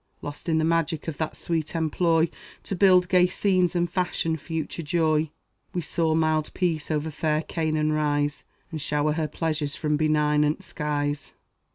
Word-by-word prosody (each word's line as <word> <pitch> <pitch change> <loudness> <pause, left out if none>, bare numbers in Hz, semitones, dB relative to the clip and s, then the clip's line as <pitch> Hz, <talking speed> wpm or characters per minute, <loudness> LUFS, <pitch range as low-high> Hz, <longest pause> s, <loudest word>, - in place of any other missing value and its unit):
Lost 145 +4 -6
in 160 - +3
the 160 - +2
magic 165 -1 0
of 160 - -4
that 160 -1 -2
sweet 165 -1 -2
employ, 165 +1 +2 0.4
To 195 - -3
build 185 -1 +5
gay 180 0 +5
scenes 185 -1 +1
and 175 0 +2
fashion 175 -2 -1
future 160 +1 -4
joy, 155 -1 +1 0.5
We 175 - 0
saw 160 -1 +1
mild 155 -1 +1
Peace 165 -5 -1
over 155 0 -1
fair 155 +1 0
Canaan 155 -2 0
rise, 145 -1 0 0.3
And 155 -2 -4
shower 150 +1 +1
her 155 0 -1
pleasures 155 -1 -2
from 150 -1 0
benignant 150 -1 +2
skies. 145 -1 -3
155 Hz, 160 wpm, -25 LUFS, 150-165 Hz, 0.5 s, build